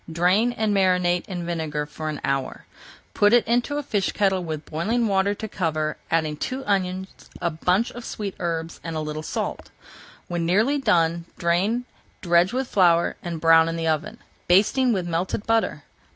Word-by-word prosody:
Drain 180 +8 +3
and 220 -3 0
marinate 180 -2 +2
in 180 -3 -5
vinegar 160 -3 -2
for 155 +1 -6
an 150 - -4
hour. 135 -1 -2 0.5
Put 205 +2 +4
it 240 - +5
into 245 +5 +1
a 295 - -2
fish 205 -8 -1
kettle 190 -3 +1
with 155 -2 -5
boiling 220 +9 0
water 200 0 +1
to 220 - -6
cover, 155 -6 -2
adding 155 -2 0
two 265 - -4
onions, 190 -1 -2
a 170 - -1
bunch 180 +8 +1
of 240 - -9
sweet 205 -4 -5
herbs, 165 -1 -3
and 165 -1 -5
a - - -1
little 155 0 -4
salt. 155 - -4 0.6
When 175 -1 -2
nearly 215 +12 +2
done 170 -8 +2
drain, 195 +9 +1 0.4
dredge 175 +1 +3
with 260 +1 -2
flour, 170 -5 +3
and 170 -2 -5
brown 165 0 +5
in 165 - -3
the 165 0 -3
oven, 160 +8 -1 0.3
basting 215 +8 +4
with 190 -5 -1
melted 175 +4 -2
butter. 225 0 0
180 Hz, 175 wpm, -24 LUFS, 165-210 Hz, 0.6 s, it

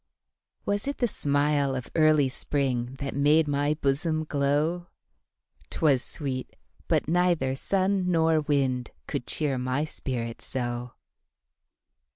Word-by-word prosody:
Was 205 +5 -1
it 280 - -2
the 245 - +2
smile 145 -5 +1
of 125 -1 -6
early 155 -3 +4
springThat 130 0 -2
made 150 +3 +4
my 145 +1 +1
bosom 155 +2 0
glow?'Twas 145 - -2
sweet; 130 -4 -5 0.3
but - - +1
neither 170 -6 +2
sun 190 +4 0
nor 160 -2 +3
windCould 130 - -2
cheer 140 -4 0
my 130 +3 0
spirit 120 -6 -4
so. 120 0 -4
145 Hz, 105 wpm, -27 LUFS, 130-155 Hz, 0.3 s, early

